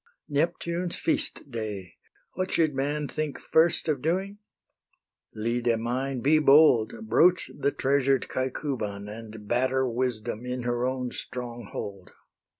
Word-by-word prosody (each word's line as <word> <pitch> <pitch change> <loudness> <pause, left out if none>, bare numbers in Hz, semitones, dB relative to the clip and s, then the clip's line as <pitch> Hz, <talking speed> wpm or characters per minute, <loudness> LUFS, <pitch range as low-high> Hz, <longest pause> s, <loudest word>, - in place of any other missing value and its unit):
Neptune's 170 +3 -1
feast 145 - -2
day! 105 -6 -5 0.4
what 185 +1 -2
should 155 -3 +2
man 145 +2 -1
Think 155 -1 -3
first 160 +1 +3
of 145 -5 0
doing? 190 +6 -1 1.0
Lyde 115 +1 0
mine, 125 +3 -2
be 155 +4 +4
bold, 150 - +5
Broach 180 -3 +4
the 140 - +1
treasured 135 -1 +2
Caecuban, 125 -6 -3
And 110 0 -9
batter 130 +2 +1
Wisdom 120 -2 -2
in 125 0 -3
her 120 +1 0
own 130 -1 -2
stronghold. 120 -6 -6
130 Hz, 120 wpm, -27 LUFS, 115-150 Hz, 1.0 s, bold